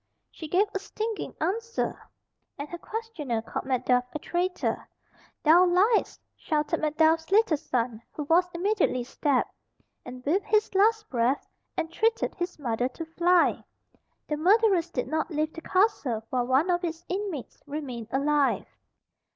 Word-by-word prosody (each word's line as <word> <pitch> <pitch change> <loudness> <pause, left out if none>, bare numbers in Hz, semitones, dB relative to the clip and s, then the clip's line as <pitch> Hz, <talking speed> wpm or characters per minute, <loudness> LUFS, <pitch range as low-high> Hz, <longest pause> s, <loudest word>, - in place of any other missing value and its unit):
She 315 - -8
gave 370 +6 +3
a 390 - -1
stinging 435 +2 -4
answer, 460 +4 -2 0.5
and 285 +1 -5
her 345 - -6
questioner 360 - -4
called - - -5
Macduff 250 -1 +2
a - - +2
traitor. 355 +4 -2 0.5
"Thou 330 +4 +7
liest!" 395 +6 +2 0.2
shouted 300 -2 -1
Macduff's 320 +1 +2
little 410 -4 +4
son, 240 -5 -2
who 300 - -5
was 345 +5 +3
immediately 355 - +1
stabbed, 265 +1 0 0.5
and 250 0 -10
with 365 +8 +2
his 430 -1 +2
last 430 +2 +3
breath 245 +2 +1 0.3
entreated 430 +8 0
his 355 0 -4
mother 245 -4 -1
to 330 +5 -7
fly. 345 +2 +2 0.6
The 300 - -1
murderers 380 0 +4
did - - -3
not 315 +1 -1
leave 310 -1 -1
the 330 - -8
castle 315 - +1
while 245 -1 0
one 275 +8 +3
of 350 0 0
its 330 0 -4
inmates 370 - -4
remained 270 -6 -5
alive. 285 +2 +1
325 Hz, 145 wpm, -27 LUFS, 275-380 Hz, 0.6 s, Thou